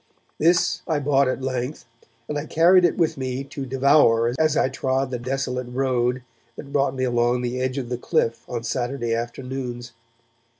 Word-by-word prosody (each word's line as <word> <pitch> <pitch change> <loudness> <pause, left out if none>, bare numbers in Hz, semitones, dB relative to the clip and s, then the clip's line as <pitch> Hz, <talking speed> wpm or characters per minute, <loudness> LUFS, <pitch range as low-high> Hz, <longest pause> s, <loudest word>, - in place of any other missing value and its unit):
This 170 +3 +3
I 160 -3 +1
bought 140 -1 +2
at 130 0 -2
length, 130 +2 -3 0.4
and 150 - -4
I 145 +1 -3
carried 175 +4 +5
it 175 - +1
with 165 -4 +1
me 130 0 -3
to 140 -1 -7
devour 130 -3 +4
as 155 -1 +2
I - - +3
trod 130 0 -1
the 125 - -3
desolate 125 0 -3
road 125 -1 0 0.3
that 140 -1 -10
brought 140 -1 +1
me 130 - -2
along 120 0 +1
the 125 +1 -2
edge 130 +1 -1
of 125 -3 -4
the 125 -1 -3
cliff 115 -1 0
on 120 -2 -4
Saturday 120 0 -2
afternoons. 120 +1 -5
130 Hz, 175 wpm, -23 LUFS, 120-140 Hz, 0.4 s, carried